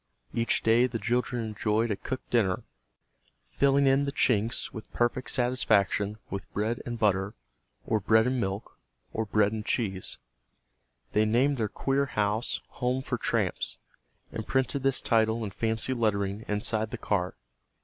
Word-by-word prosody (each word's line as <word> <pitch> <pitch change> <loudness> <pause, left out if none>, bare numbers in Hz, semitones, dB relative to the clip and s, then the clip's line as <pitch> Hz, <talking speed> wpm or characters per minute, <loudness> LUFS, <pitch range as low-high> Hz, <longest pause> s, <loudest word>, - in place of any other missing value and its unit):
Each 115 0 +1
day 115 +3 +5
the 120 - -3
children 120 +2 -1
enjoyed 110 +1 0
a - - +1
cooked 130 +5 -6
dinner, 100 -6 +2 0.9
filling 140 0 +3
in 135 +1 +4
the 140 - -1
chinks 115 -4 +1
with 110 - -9
perfect 120 +2 0
satisfaction 110 -5 +2
with 100 0 -5
bread 110 +4 -1
and 120 0 -3
butter, 100 -1 +1 0.5
or 110 - +1
bread 110 +3 +4
and 125 0 0
milk, 95 +1 -4 0.3
or 110 0 -2
bread 105 0 +3
and 110 -1 -4
cheese. 95 -5 -2 0.9
They 105 +1 +3
named 130 +6 +2
their 110 -3 0
queer 140 +5 0
house, 105 +1 0 0.2
"Home 130 0 0
for - - -2
Tramps," - - +1 0.5
and 110 - -5
printed 135 +1 0
this 135 0 +1
title 110 0 +2
in 100 - -4
fancy 115 +5 0
lettering 105 -3 0
inside 110 +1 0
the - - -5
car. 90 -3 -1
110 Hz, 150 wpm, -28 LUFS, 105-125 Hz, 0.9 s, day